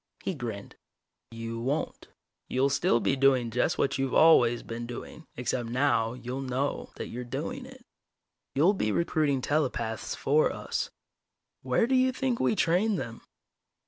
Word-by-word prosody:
He 190 - -1
grinned. 115 - -6 0.5
"You 115 0 -6
won't. 135 +6 -2 0.4
You'll 135 +2 +1
still 120 -3 +2
be 135 - +1
doing 130 -3 +3
just 125 - +1
what 135 - 0
you've 135 -1 0
always 120 -7 +5
been 115 +1 -6
doing, 125 +6 -8
except 120 -1 -2
now 120 -3 +1
you'll 125 +1 -5
know 135 +2 -2
that - - -6
you're 125 +1 -5
doing 140 - -5
it. 260 -2 -15 0.7
You'll 165 +9 +5
be 110 - 0
recruiting 150 -2 +1
telepaths 130 -6 -1
for 150 +3 +2
us. - - -3 0.7
Where - - +2
do 260 - -1
you 260 0 +4
think 255 -2 -1
we - - +2
train 190 +4 +2
them?" 115 -9 -5
135 Hz, 150 wpm, -28 LUFS, 120-160 Hz, 0.7 s, always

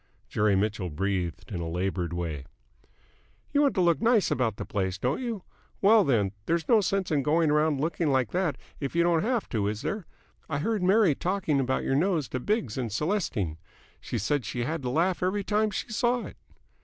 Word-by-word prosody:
Jerry 105 -1 +2
Mitchell 100 -2 0
breathed 95 +2 -3
in 90 -4 -3
a 85 - -3
laboured 90 0 -2
way. 80 -5 -4 1.0
"You 285 - +3
want 285 -2 +3
to 185 - +2
look 170 0 +3
nice 230 -4 +3
about 115 -4 +1
the - - -6
place, 95 -2 -2
don't 125 - -1
you? 230 -7 -4 0.4
Well, 210 +2 +6
then! 110 - +2 0.2
there's 170 0 0
no 225 -3 +5
sense 195 -2 -1
in 145 -2 +2
going 155 +2 +2
around 150 -1 +2
looking 165 +2 0
like 130 -3 +1
that 175 -7 0 0.2
if 140 +1 -4
you 170 - +4
don't 170 -2 +3
have 235 0 0
to, 105 -4 0
is 105 +4 -3
there? 195 +2 -3 0.4
I 150 - -1
heard 210 +7 -1
Mary 190 -2 +4
talking 175 -3 0
about 130 0 0
your - - 0
nose 165 -2 +1
to 130 - -3
Biggs 135 - -1
and 120 -3 -2
Celestine. 115 - -1 0.4
She - - -4
said 145 +6 0
she 120 +4 -3
had 155 +5 -2
to 125 - -2
laugh 170 +7 +1
every 195 +3 0
time 215 +2 +1
she 210 - -4
saw 240 +2 0
it." - - -10
150 Hz, 205 wpm, -27 LUFS, -, 1.0 s, Well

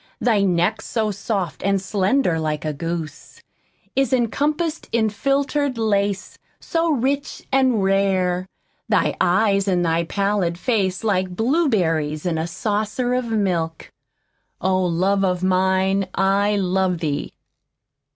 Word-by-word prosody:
Thy 220 -4 +2
neck 185 +2 +1
so 220 -2 -1
soft 200 -2 -3
An' 195 0 +2
slender 195 0 +1
like 155 -1 -2
a 155 - -1
goose, 165 0 -6 0.6
Is 270 0 +1
encompassed 295 +7 0
in 220 -2 +1
filtered 275 +3 0
lace 205 -2 -1 0.2
So 330 0 0
rich 280 +1 -1
an' 260 -2 +3
Rare. 190 -2 +1 0.4
Thy - - +2
eyes 195 +2 +2
in 180 -2 +2
thy 165 0 +1
pallid 195 -2 0
face 195 -4 0
like 185 -4 0
Blueberries 185 - +1
in 165 -3 0
a 160 - -2
Saucer 215 +6 -1
of 250 0 0
milk. 175 -7 -1 0.7
Oh, 185 0 +1
love 190 +3 +1
of 180 -1 0
mine, 190 +1 +2
I 200 +2 +2
love 190 -2 +1
Thee." 150 -3 -3
195 Hz, 125 wpm, -21 LUFS, 180-225 Hz, 0.7 s, an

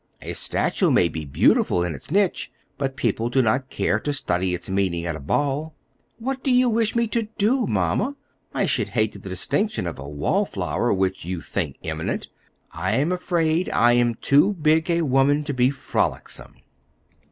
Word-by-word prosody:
A - - -5
statue - - 0
may 85 - +4
be 80 -2 -5
beautiful 80 +5 +3
in 85 -2 -2
its 70 - -10
niche, 195 +2 +1 0.3
but 135 -1 -2
people 115 -3 0
do 130 +1 +3
not 130 +4 0
care - - 0
to 145 - -2
study 90 -8 0
its 90 - -8
meaning 95 -3 0
at 85 -2 -2
a - - -7
ball." 145 - -1 0.4
"What 260 +3 -4
do - - 0
you 250 0 +4
wish 225 -1 +1
me 235 0 +3
to 230 -1 -1
do, 230 +3 +2
Mamma? 95 - 0 0.4
I - - 0
should - - 0
hate - - 0
the - - -10
distinction 210 - -1
of 85 -5 -5
a 70 +1 -7
wall 75 -1 0
flower, - - -1
which 95 0 0
you 90 +1 -4
think - - -3
imminent. - - -3 0.4
I 95 +7 -1
am 145 +7 +1
afraid 175 -1 0
I 120 +1 +4
am 120 -1 +2
too 145 - +3
big 160 -1 +2
a 170 0 +2
woman 140 +1 +3
to 145 -1 -3
be 125 0 +3
frolicsome." 140 -1 -3
135 Hz, 185 wpm, -23 LUFS, -, 0.4 s, may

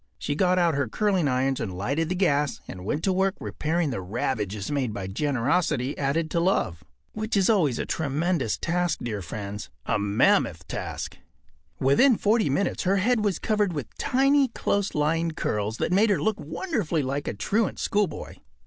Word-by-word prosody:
She 145 - -2
got 180 +4 +2
out 170 -2 +3
her 140 -2 0
curling 190 - +1
irons 130 0 +1
and 95 -5 -4
lighted 140 - -1
the 180 - 0
gas 145 - +1
and 90 -1 -8
went 150 +9 -2
to 190 - +2
work 190 +1 +1
repairing 160 -1 -1
the 115 - -3
ravages 105 +1 -2
made 130 -7 -1
by 100 - -4
generosity 135 - 0
added 155 +3 -1
to 170 - +1
love. 170 - 0 0.3
Which 215 0 -1
is 195 +3 +4
always 155 - +2
a - - -2
tremendous 155 - 0
task, 175 -1 0
dear 110 -4 -3
friends—a 105 +4 -4
mammoth 100 +1 +2
task. - - -5 0.6
Within 215 - +5
forty 215 -3 +2
minutes 175 +8 0
her 195 +2 +2
head 220 +3 +2
was 200 -3 +1
covered 210 -4 0
with 145 -7 -6
tiny, 275 +1 +3
close 205 -4 -1
lying 165 +3 +1
curls 105 -5 -2
that - - 0
made 210 +4 +4
her 195 -6 +2
look 215 +8 0
wonderfully 170 - -2
like 140 +2 -3
a - - -2
truant 200 - 0
schoolboy. 205 -2 -1
155 Hz, 175 wpm, -26 LUFS, 125-195 Hz, 0.6 s, Within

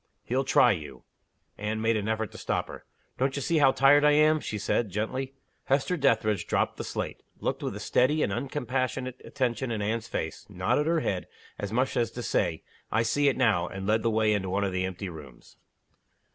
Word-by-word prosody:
He'll 130 +3 0
try 130 - +5
you." 75 -9 -6 0.6
Anne 105 +1 -2
made 115 +1 +2
an 105 -1 -2
effort 110 -1 -1
to - - -10
stop - - -1
her. - - -10 0.3
"Don't 135 +1 +1
you 140 - -2
see 165 +3 +2
how 135 -2 +6
tired 140 +2 +5
I 150 0 +6
am?" 155 +1 +5
she 110 - -4
said, 105 +2 0
gently. 130 +7 -3 0.3
Hester 140 +6 +1
Dethridge 110 - +1
dropped - - 0
the - - -4
slate - - -4 0.2
looked - - -2
with - - -3
a - - -6
steady 150 +5 +2
and - - 0
uncompassionate 130 -2 -3
attention 130 -2 -2
in 110 -2 -2
Anne's 110 +2 -2
face 80 -7 -4
nodded 110 - 0
her 165 -1 +2
head, 95 -8 -2 0.3
as 100 - -4
much 125 +4 0
as 120 -1 +1
to 120 - -5
say, - - 0 0.3
"I 115 +2 +2
see 145 +5 +2
it 135 - -1
now" 110 -9 +2
and 95 +1 -6
led 110 +2 +2
the 115 - +1
way 110 -1 +2
into 95 -2 -1
one 100 +2 0
of 100 - 0
the 95 0 -1
empty 95 +1 -5
rooms. 75 -8 -12
115 Hz, 210 wpm, -28 LUFS, 100-135 Hz, 0.6 s, how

